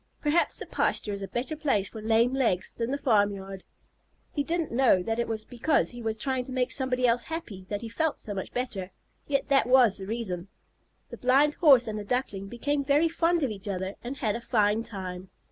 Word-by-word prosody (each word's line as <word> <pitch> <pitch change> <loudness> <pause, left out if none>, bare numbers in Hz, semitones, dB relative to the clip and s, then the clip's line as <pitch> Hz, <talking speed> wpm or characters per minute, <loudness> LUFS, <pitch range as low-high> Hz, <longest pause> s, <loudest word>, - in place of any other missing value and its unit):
Perhaps 300 +3 +1
the - - -5
pasture 205 - 0
is 200 - -5
a 195 - -4
better 255 +9 -3
place 240 -11 0
for 220 - -9
lame 225 +3 +3
legs 225 -9 0
than 230 0 -3
the 280 - -1
farmyard." 205 -7 0 0.7
He 290 - -1
didn't 335 +1 -2
know 235 -7 +4
that 225 +4 -2
it 235 - 0
was 220 -1 -3
because 250 +6 +1
he 240 -1 -9
was 220 -1 -2
trying 260 +2 -1
to 260 - -9
make 255 -1 0
somebody 255 -2 +1
else 240 0 +2
happy 235 - -6
that 205 +1 -3
he - - -4
felt 315 +7 -1
so 205 - -1
much 190 -2 -5
better, 210 -7 -3 0.4
yet 275 -1 0
that 275 -4 +4
was 250 -6 +5
the 190 - -7
reason. 200 -5 -3 0.6
The - - -7
Blind 275 +4 +3
Horse 275 -9 +6
and 215 -1 -3
the - - -5
Duckling 205 -4 -2
became 280 +6 -1
very 295 +4 +3
fond 335 0 +1
of 260 - 0
each 205 0 -6
other 190 0 -3
and 255 +3 -5
had 215 -6 -1
a 235 - -5
fine 215 -2 +2
time. 185 -4 -6
235 Hz, 215 wpm, -27 LUFS, 205-270 Hz, 0.7 s, Horse